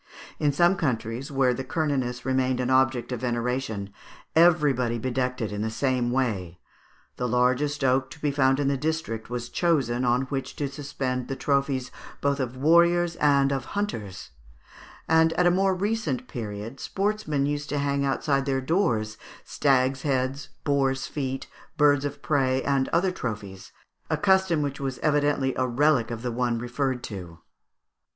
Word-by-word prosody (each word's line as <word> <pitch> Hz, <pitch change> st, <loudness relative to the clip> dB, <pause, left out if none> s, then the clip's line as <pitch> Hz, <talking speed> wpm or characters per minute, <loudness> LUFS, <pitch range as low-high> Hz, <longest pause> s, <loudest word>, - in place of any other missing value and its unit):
In 145 Hz, -, +2 dB
some 175 Hz, +6 st, +3 dB
countries, 125 Hz, -1 st, -2 dB
where 135 Hz, -2 st, +2 dB
the 130 Hz, -, -4 dB
Cernunnos 130 Hz, -5 st, -2 dB
remained 130 Hz, -1 st, +1 dB
an 125 Hz, 0 st, 0 dB
object 130 Hz, -2 st, +2 dB
of 125 Hz, -, -2 dB
veneration, 120 Hz, -4 st, -2 dB, 0.4 s
everybody 145 Hz, -8 st, +4 dB
bedecked 125 Hz, +1 st, -2 dB
it 110 Hz, -, -2 dB
in 105 Hz, 0 st, -3 dB
the 110 Hz, -, -1 dB
same 125 Hz, +1 st, 0 dB
way. 105 Hz, -9 st, -1 dB, 0.6 s
The 125 Hz, -, -1 dB
largest 125 Hz, +4 st, +1 dB
oak 130 Hz, 0 st, +2 dB
to 150 Hz, -, -12 dB
be 150 Hz, -1 st, 0 dB
found 135 Hz, -1 st, +2 dB
in 145 Hz, -, +1 dB
the 140 Hz, 0 st, +1 dB
district 150 Hz, -7 st, -3 dB
was 120 Hz, -1 st, -4 dB
chosen 130 Hz, -9 st, +1 dB
on 125 Hz, +1 st, +2 dB
which 135 Hz, -1 st, -4 dB
to 145 Hz, -, -2 dB
suspend 135 Hz, -3 st, -3 dB
the 135 Hz, -, -3 dB
trophies 140 Hz, -2 st, 0 dB, 0.3 s
both 140 Hz, 0 st, 0 dB
of 130 Hz, -1 st, -3 dB
warriors 170 Hz, +3 st, +4 dB
and 140 Hz, -2 st, +3 dB
of 135 Hz, -2 st, -3 dB
hunters; 105 Hz, -, -4 dB, 0.8 s
and, 160 Hz, 0 st, +4 dB
at 180 Hz, -, +2 dB
a 175 Hz, -, +5 dB
more 190 Hz, +1 st, +2 dB
recent 225 Hz, +6 st, -2 dB
period, 110 Hz, 0 st, -6 dB
sportsmen 200 Hz, -8 st, -1 dB
used 145 Hz, 0 st, -2 dB
to 145 Hz, -, -1 dB
hang 140 Hz, 0 st, 0 dB
outside 135 Hz, 0 st, 0 dB
their 135 Hz, -1 st, +1 dB
doors 120 Hz, -, 0 dB, 0.2 s
stags' 135 Hz, -1 st, +1 dB
heads, 135 Hz, 0 st, -1 dB
boars' 135 Hz, -2 st, +1 dB
feet, 135 Hz, -2 st, -4 dB, 0.3 s
birds 145 Hz, -1 st, +4 dB
of 145 Hz, -, -5 dB
prey, 130 Hz, -3 st, +1 dB
and 135 Hz, -1 st, +1 dB
other 180 Hz, +3 st, +2 dB
trophies, 105 Hz, -, -6 dB, 0.4 s
a -, -, +1 dB
custom 190 Hz, -6 st, +3 dB
which 140 Hz, -1 st, -3 dB, 0.2 s
evidently 145 Hz, -3 st, +2 dB
was 130 Hz, -, -4 dB
a 130 Hz, -, +2 dB
relic 130 Hz, -1 st, +2 dB
of 115 Hz, -1 st, -5 dB
the 125 Hz, -, -2 dB
one 120 Hz, 0 st, 0 dB
referred 125 Hz, +2 st, -2 dB
to. 90 Hz, -5 st, -7 dB
135 Hz, 160 wpm, -26 LUFS, 125-145 Hz, 0.8 s, a